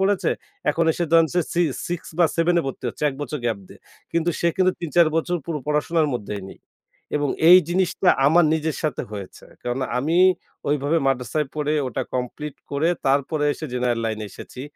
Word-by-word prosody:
পড়েছে। 195 0 +2 0.4
এখন 165 - +1
সে 175 - +1
ধরেন 165 -1 +6
যে 180 - +3
সি 175 - +2 0.3
6 175 -1 -2 0.2
বা 175 - +6
7 170 +1 +3
এ - - -5
ভর্তি 135 - -6
হচ্ছে 120 - -8
১ 140 - -4
বছর 145 +1 -4
গ্যাপ 115 -3 0
দিয়ে। - - -15 0.3
কিন্তু 170 +1 +1
সে 170 - +3
কিন্তু 185 0 +3
৩ 170 - -3
৪ 170 - +7
বছর 175 +2 0
পুরো 165 -3 -2
পড়াশোনার 150 +2 +1
মধ্যেই 105 -3 -4
নেই - - -12 0.6
এবং 145 -1 0 0.2
এই 180 +1 +11
জিনিসটা 180 +1 +1 0.2
আমার 165 +4 +5
নিজের 160 -2 -1
সাথে 155 -5 -1
হয়েছে। 100 -3 -8 0.2
কারণ 125 +1 -2 0.2
আমি 155 +6 0 0.5
ঐভাবে 145 +3 +1
মাদ্রাসায় 135 +3 0
পড়ে 150 0 -1 0.2
ওটা 120 - -3
কমপ্লিট 130 +4 -4 0.2
করে 145 +4 +1 0.2
তারপরে 140 +3 +1
এসে 155 - -6
জেনারেল 125 -2 0
লাইনে 110 -1 -2
এসেছি। 125 - -10
150 Hz, 185 wpm, -23 LUFS, 130-170 Hz, 0.6 s, এই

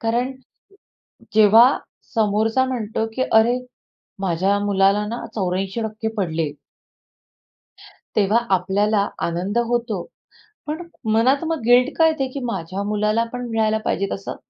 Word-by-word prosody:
कारण, 240 +3 0 1.0
जेव्हा 220 +2 +7 0.5
समोरचा 220 +3 +2
म्हणतो 225 -3 -2
की 260 - 0
"अरे, 230 +3 +4 0.6
माझ्या 190 +2 +1
मुलाला 200 +1 +2
ना, 235 +2 -5
84% 210 +3 -2
पडले. 165 -6 -1 1.6
तेव्हा 210 +2 +3 0.2
आपल्याला 200 +3 +1 0.2
आनंद 180 +6 -2
होतो. 235 -6 -1 0.7
पण 310 +3 -3 0.3
मनात 260 +7 +3
मग 325 -2 -2
गिल्ट 245 +2 +5
का 325 - +5
येते, 295 -4 0
की 280 - -4
माझ्या 190 -3 -4
मुलाला 210 +2 +1
पण 245 0 -4
मिळायला 220 -1 +1
पाहिजे 200 - 0
तसं. 195 - -5
215 Hz, 115 wpm, -21 LUFS, 195-240 Hz, 1.6 s, जेव्हा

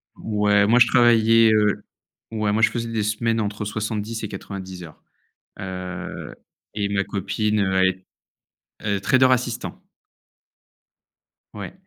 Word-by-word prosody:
Ouais, 105 -1 +2
moi, 120 +2 +5
je 120 - +7
travaillais, 115 -1 +5
heu, 105 -1 +2 0.5
ouais, 110 -2 -1
moi, 110 +2 +1
je 110 - +5
faisais 115 -1 -4
des 110 -2 -1
semaines 115 +2 0
entre 105 0 -3
70 110 +1 -4
et - - -2
90 95 -2 -8
heures, 80 -2 -13 0.6
heu 90 -2 -6 0.4
et 100 -1 -1
ma 100 0 0
copine, 105 +2 -1
heu, 95 -1 0
elle 95 0 +5
est 95 0 -6 0.8
elle 105 -1 0
est - - -2
trader 130 +5 +4
assistant. 120 -2 -2 1.7
Ouais 100 -2 -7
105 Hz, 140 wpm, -22 LUFS, 100-115 Hz, 1.7 s, je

